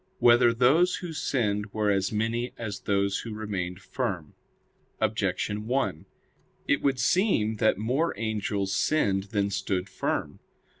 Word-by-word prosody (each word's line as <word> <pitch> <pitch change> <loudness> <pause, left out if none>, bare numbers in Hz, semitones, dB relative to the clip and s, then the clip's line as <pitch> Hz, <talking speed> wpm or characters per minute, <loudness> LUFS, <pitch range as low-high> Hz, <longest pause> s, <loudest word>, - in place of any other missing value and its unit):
9] - - -42
Whether 120 -5 +6
Those 140 +10 +4
Who 175 -2 -6
Sinned 105 -8 -1
Were 105 -1 +1
As 95 -1 0
Many 115 +3 -1
As 105 -4 -5
Those 100 -1 0
Who 115 -2 -6
Remained 95 -4 -4
Firm? 85 -6 -3 0.7
Objection 105 +1 -1
1: 105 - -1 0.6
It - - +2
would 140 -2 +1
seem 125 - +2
that 110 - +3
more 130 +10 0
angels 105 -3 -2
sinned 95 -5 +1
than 100 -1 -1
stood 95 -1 -1
firm. 95 - -3
105 Hz, 140 wpm, -27 LUFS, 100-120 Hz, 0.7 s, Whether